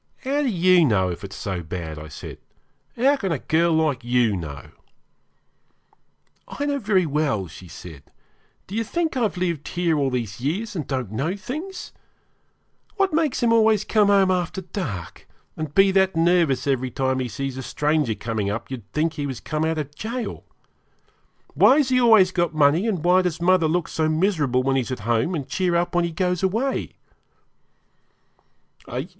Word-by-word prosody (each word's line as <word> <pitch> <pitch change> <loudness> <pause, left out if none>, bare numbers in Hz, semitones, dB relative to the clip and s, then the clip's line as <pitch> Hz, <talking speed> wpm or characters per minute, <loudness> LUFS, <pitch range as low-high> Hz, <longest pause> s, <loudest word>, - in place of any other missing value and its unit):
'How 280 +2 0
do 290 - 0
you 185 -3 +4
know 100 -10 +2
it's 95 +3 -7
so 95 -3 -4
bad?' 80 -2 -7
said - - -9 0.6
I. 235 - -4
'How 280 +2 +5
can 195 -8 -2
a 160 - 0
girl 165 +5 +1
like 155 -6 +1
you 120 -3 +2
know?' 75 -7 -7 1.8
'I 285 - -4
know 285 -1 -1
very 200 -6 +2
well,' 145 -9 0
she 90 +3 -12
said. 80 -4 -11 0.6
'Do 190 - -11
you 225 +2 0
think 325 +6 -2
I've 230 -7 0
lived 170 -5 -2
here 170 -3 0
all 140 -1 +1
these 120 -4 -4
years 200 - -2
and 155 -7 -4
don't 130 -7 -3
know 140 - -2
things? 310 - -7 1.0
What 390 -4 +1
makes 310 -6 +1
him 230 -1 +4
always 220 -2 +4
come 210 -1 +2
home 195 -2 +4
after 180 +1 -1
dark, 165 - -6 0.3
and 155 -2 -6
be 195 0 +6
that 190 -1 +2
nervous 165 -6 +2
every 130 -2 0
time 130 +1 -1
he 130 - -2
sees 135 +2 -4
a 130 - -5
stranger 145 -3 0
coming 110 -3 -3
up 110 +5 -5
you'd 115 -7 -8
think 160 +1 0
he 145 -2 -3
was 130 -4 -5
come 155 0 -3
out 160 0 0
of 145 -2 -4
gaol? 230 +5 -5 1.1
Why 270 - +6
has 285 -4 +2
he 255 -1 +3
always 220 -6 +6
got 175 -3 -1
money, 155 +7 +3
and 190 -8 -1
why 180 +1 +5
does 180 -3 -2
mother 175 -1 +3
look 170 +1 0
so 160 -1 -1
miserable 155 -7 +1
when 135 0 +1
he's 130 0 -2
at 125 - -4
home, 115 - 0
and 140 -5 -4
cheer 180 -2 0
up 175 +1 0
when 175 0 +2
he 170 - -3
goes 180 +1 -1
away?' 225 +8 -1
160 Hz, 180 wpm, -23 LUFS, 130-195 Hz, 1.8 s, be